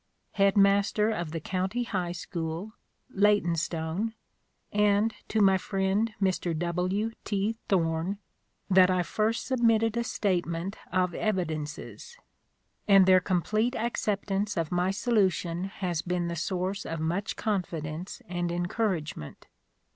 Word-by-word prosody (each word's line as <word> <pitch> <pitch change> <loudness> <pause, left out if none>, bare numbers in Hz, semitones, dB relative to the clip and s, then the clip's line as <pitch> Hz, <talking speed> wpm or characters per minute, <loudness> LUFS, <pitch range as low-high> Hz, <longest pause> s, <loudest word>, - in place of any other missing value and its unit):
Head 200 0 +3
Master 200 +2 +4
of 175 -7 -3
the 165 - -3
County 190 +8 -2
High 180 -6 -2
School, 170 +3 -5 0.4
Leytonstone, 180 0 +1 0.6
and 210 +1 +3
to 220 - +1
my 195 -1 +5
friend 195 +4 0
Mr. 185 -4 0
W. 180 +6 -1
T. 210 +2 -1
Thorn 170 +1 +1 0.5
that 185 -1 +6
I 180 -1 +2
first 215 +5 -1
sub 260 -2 -1
mitted 225 -1 +3
a 235 - 0
statement 180 -3 -1 0.2
of 180 -1 +1
evidences; 170 - -3 0.7
and 195 -2 +7
their 185 0 +7
complete 215 +7 0
acceptance 205 -3 -1
of 165 -2 -1
my 180 +1 +1
solution 190 -5 +1
has 180 -4 -3
been 175 -1 -1
the 170 - -3
source 185 +4 -2
of 165 - -4
much 175 +6 -1
confidence 180 -1 -3
and 175 -1 -2
encouragement. 175 - -2
190 Hz, 125 wpm, -28 LUFS, 175-210 Hz, 0.7 s, and